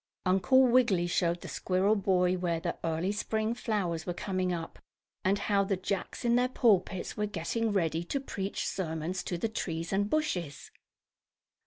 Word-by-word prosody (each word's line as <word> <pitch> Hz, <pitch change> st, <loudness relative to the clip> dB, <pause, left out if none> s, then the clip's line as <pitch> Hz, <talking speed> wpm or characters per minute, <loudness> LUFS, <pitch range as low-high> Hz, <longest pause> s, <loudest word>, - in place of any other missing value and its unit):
Uncle 195 Hz, +8 st, +5 dB
Wiggily 240 Hz, -8 st, +4 dB
showed 175 Hz, 0 st, 0 dB
the -, -, -7 dB
squirrel 190 Hz, +3 st, +1 dB
boy 185 Hz, -3 st, +2 dB
where 175 Hz, -2 st, -1 dB
the -, -, -3 dB
early 165 Hz, +3 st, 0 dB
spring 220 Hz, +2 st, -1 dB
flowers 195 Hz, -9 st, -2 dB
were 175 Hz, -, -4 dB
coming 185 Hz, -2 st, -1 dB
up, 165 Hz, -2 st, -5 dB, 0.4 s
and 195 Hz, +2 st, +2 dB
how 200 Hz, -1 st, +2 dB
the 195 Hz, -1 st, 0 dB
Jacks, 190 Hz, +5 st, -3 dB
in 235 Hz, 0 st, +4 dB
their 250 Hz, +1 st, +3 dB
pulpits, 200 Hz, -7 st, +1 dB
were 210 Hz, 0 st, -1 dB
getting 210 Hz, +4 st, -1 dB
ready 165 Hz, -4 st, 0 dB
to 275 Hz, -, -1 dB
preach 200 Hz, -7 st, -4 dB
sermons 170 Hz, 0 st, -2 dB
to 175 Hz, -, -3 dB
the 200 Hz, -, -1 dB
trees 165 Hz, -6 st, -3 dB
and 205 Hz, +1 st, +1 dB
bushes. 180 Hz, -, -2 dB
190 Hz, 165 wpm, -30 LUFS, 175-215 Hz, 0.4 s, Uncle